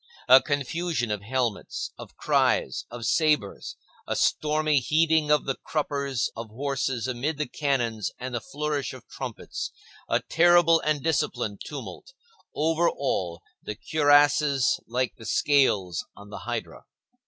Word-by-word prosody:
A 130 +1 +9
confusion 145 -2 -2
of 105 -2 -2
helmets, 120 -1 -2
of - - -12
cries, - - +1
of 120 -1 -7
sabres, 150 -8 +1 0.3
a - - -1
stormy 155 -1 +2
heaving 155 +3 +2
of 150 -1 +3
the 135 - 0
cruppers 140 -4 -2
of 115 0 -7
horses 135 0 -2
amid 130 +5 -2
the 150 - -1
cannons 120 -9 -1
and 125 0 -6
the 120 - -2
flourish 145 0 -3
of 130 - -12
trumpets, - - -6 0.4
a - - +3
terrible 170 0 +5
and 150 -3 -1
disciplined 125 -9 -1
tumult; - - -8 0.4
over 165 +2 +2
all, 90 -11 -2 0.2
the 105 - -6
cuirasses 145 -1 +3
like 125 +1 -1
the 115 - -11
scales 105 - +2
on 100 0 -13
the - - -6
hydra. 85 - -5
140 Hz, 135 wpm, -26 LUFS, 115-150 Hz, 0.4 s, A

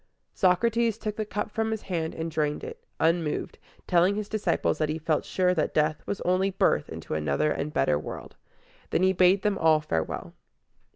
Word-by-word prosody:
Socrates 225 +4 +2
took 215 -2 -4
the 215 -1 -3
cup 210 0 -3
from 220 0 -1
his 220 -1 -3
hand 165 -4 -3
and 165 0 -4
drained 150 -2 -1
it, 470 0 -8 0.2
unmoved, 165 -2 0 0.3
telling 180 +2 +3
his 210 -1 -3
disciples 215 -1 0
that 155 -1 +1
he 155 - -1
felt 155 -1 -1
sure 180 -1 +1
that 155 -4 -1
death 155 0 +1
was 200 - -3
only 185 +2 +2
birth 185 - +1
into - - -6
another 75 - 0
and 150 - -2
better 75 - +2
world. - - -8 0.5
Then 180 - +1
he 190 0 +4
bade 185 +1 +4
them 205 -2 +1
all 160 -1 +5
farewell. 80 - -3
180 Hz, 185 wpm, -27 LUFS, 155-205 Hz, 0.5 s, all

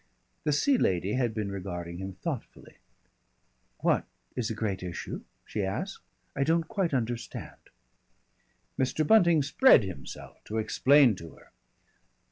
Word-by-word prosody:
The 150 - +2
Sea 250 - +3
Lady 95 +2 +1
had 125 -3 +1
been 105 -2 -3
regarding 90 -3 -5
him 95 0 -5
thoughtfully. 135 - -7 1.0
"What - - +2 0.3
is 120 -3 -1
a 110 - -3
great 100 -4 -2
issue?" 90 -2 -5 0.2
she 105 - -3
asked. 120 - -3 0.3
"I 140 - +1
don't 165 +2 +1
quite 195 -4 -1
understand." 120 -3 -3 1.2
Mr. 135 +4 +1
Bunting 170 -6 +5
spread 260 - +6
himself 95 -8 -9
to 110 - -4
explain 130 +2 +4
to 85 -1 -10
her. - - -20
115 Hz, 130 wpm, -29 LUFS, 95-150 Hz, 1.2 s, spread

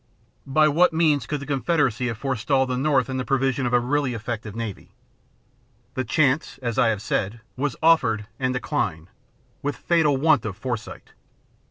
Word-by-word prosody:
By 155 +3 +4
what 170 +3 +3
means 155 -4 +2
could 150 -2 -3
the - - -6
Confederacy 135 -4 0
have 115 -3 -3
forestalled 130 +1 0
the 125 - 0
North 135 -1 +2
in 130 -1 -3
the 130 - -1
provision 135 0 0
of - - -2
a 125 - +5
really 130 0 0
effective 110 -2 -5
navy? 115 -4 -6 1.0
The 130 - -2
chance, 140 +4 +1
as 120 -2 -1
I 120 - +5
have 110 -2 -1
said, 105 +3 -1 0.2
was 140 0 -2
offered, 125 -10 +3
and 130 -1 0
declined, 115 - -2 0.5
with 145 0 -2
fatal 160 -5 +2
want 150 -3 +3
of 100 -4 -5
foresight. 125 -5 -6
130 Hz, 170 wpm, -24 LUFS, 115-145 Hz, 1.0 s, a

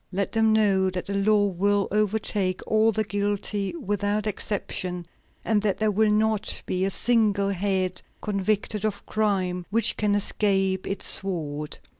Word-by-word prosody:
Let 195 +1 -2
them 220 -1 +3
know 200 -3 +3
that 180 -1 -4
the 200 - -4
law 205 +1 +3
will 200 +1 +1
overtake 210 -2 0
all 220 +1 +3
the 215 0 -1
guilty 205 - -2
without 205 - -1
exception, 185 -4 -3 0.4
and 215 -2 +2
that 205 -2 0
there 215 -1 +1
will 215 +1 +2
not 215 0 0
be 185 +1 -1
a - - 0
single 210 -2 +1
head 190 -1 -1 0.2
convicted 210 +1 -1
of 215 -2 -3
crime 190 -4 -1
which 225 +3 +1
can 210 -1 +1
escape 195 -2 0
its 195 - -3
sword." 150 -6 +1
205 Hz, 150 wpm, -25 LUFS, 190-215 Hz, 0.4 s, them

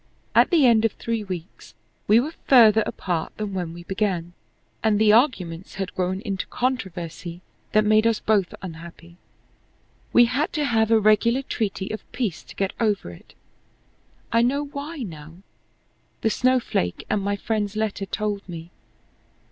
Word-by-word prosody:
At - - +5
the 325 -6 +4
end 230 -3 +5
of 225 - +2
three 230 -2 -3
weeks 185 -3 -8 0.3
we 215 +2 +6
were 300 +6 -2
farther 225 -4 +7
apart 170 -4 -3
than 210 -2 -4
when 180 -3 -3
we 170 +1 -10
began, 185 -3 -2 0.5
and 220 -2 +3
the 210 0 +5
arguments 190 - +1
had 195 -1 -4
grown 185 +1 -1
into 195 -3 -4
controversy 180 -8 -3 0.3
that 215 0 +4
made 215 +1 +4
us 225 -1 +1
both 205 -5 +1
unhappy. 170 0 -10 0.9
We 240 - +7
had 265 +6 -1
to 300 -1 0
have 220 -4 +2
a 225 -1 +5
regular 220 +5 +3
treaty 200 -6 -3
of 215 - -8
peace 220 -10 -2
to - - -13
get 195 -1 -1
over 210 - 0
it. 85 - -16 1.0
I 230 - +4
know 280 +5 +1
why 285 +1 -6
now. 160 -5 -9 0.9
The 220 - +2
snowflake 250 - 0
and 210 - 0
my 200 +1 -1
friend's 210 0 -2
letter 215 -2 -2
told 210 -1 -2
me. 170 0 -8
210 Hz, 155 wpm, -24 LUFS, 185-230 Hz, 1.0 s, farther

